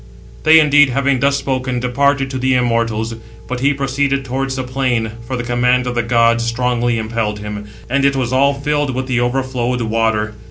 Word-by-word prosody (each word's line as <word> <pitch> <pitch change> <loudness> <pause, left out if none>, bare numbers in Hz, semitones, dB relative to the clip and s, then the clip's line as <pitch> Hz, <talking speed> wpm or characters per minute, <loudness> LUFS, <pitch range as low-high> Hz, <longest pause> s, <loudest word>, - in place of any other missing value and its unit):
They 160 +1 +6
indeed 145 -2 +5
having 135 +1 +1
thus 140 +1 +2
spoken, 130 -2 -2
departed 135 +2 0
to 130 - -3
the 130 0 +1
immortals. 115 -2 0 0.3
But 125 0 -4
he 140 +3 +2
proceeded 140 0 -1
towards 135 +1 -2
the 130 - -3
plain 125 -3 -1 0.2
(for 130 - -3
the 120 - -3
command 125 +1 +1
of 125 - -2
the 120 - 0
gods 115 0 +2
strongly 120 0 0
impelled 110 -1 -2
him), 105 0 -6 0.2
and 135 +2 0
it 140 0 +3
was 130 -2 -1
all 140 +2 +3
filled 145 -1 -1
with 130 0 -2
the 125 -2 0
overflowed 125 -1 -1
water. 110 -1 0
125 Hz, 190 wpm, -17 LUFS, 115-135 Hz, 0.3 s, They